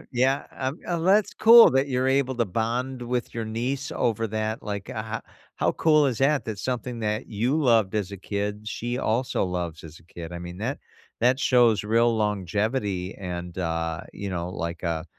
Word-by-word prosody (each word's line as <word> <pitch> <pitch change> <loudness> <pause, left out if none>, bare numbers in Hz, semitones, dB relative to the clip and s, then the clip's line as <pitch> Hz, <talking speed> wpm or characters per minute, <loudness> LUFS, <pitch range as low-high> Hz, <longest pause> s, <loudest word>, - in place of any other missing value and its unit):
yeah, 130 +3 +2
um, 135 +4 -3
and 170 0 -1
that's 200 +2 +4
cool 230 +1 +9
that 135 +1 +2
you're 130 0 +1
able 135 -1 +1
to 120 - +2
bond 120 +5 -2
with 120 0 -3
your 115 -1 -3
niece 125 +5 -3
over 115 -1 0
that, 110 +3 -3
like, 100 -2 -5
ho 110 0 -4 0.4
how - - +1
cool 155 -2 +4
is 125 -5 -1
that, 140 +2 +2
that 110 -2 -4
something 125 0 -3
that 105 +1 -2
you 120 +7 0
loved 110 -6 +3
as 100 -2 -2
a - - -5
kid, 105 +2 -4
she 120 +3 -3
also 125 +1 0
loves 90 -3 -4
as 80 0 -11
a - - -21
kid, 85 0 -9
I 85 - -5
mean, 90 +1 -8
that 120 +7 -3 0.4
that 125 +3 +3
shows 120 -6 +4
real 115 +1 +3
longevity 105 -1 -1
and, 90 -1 -6
uh, 80 -1 -2
you 100 -1 -5
know, 85 -1 -3
like, 85 -2 -5
uh, 85 -2 -2
110 Hz, 190 wpm, -25 LUFS, 95-130 Hz, 0.4 s, cool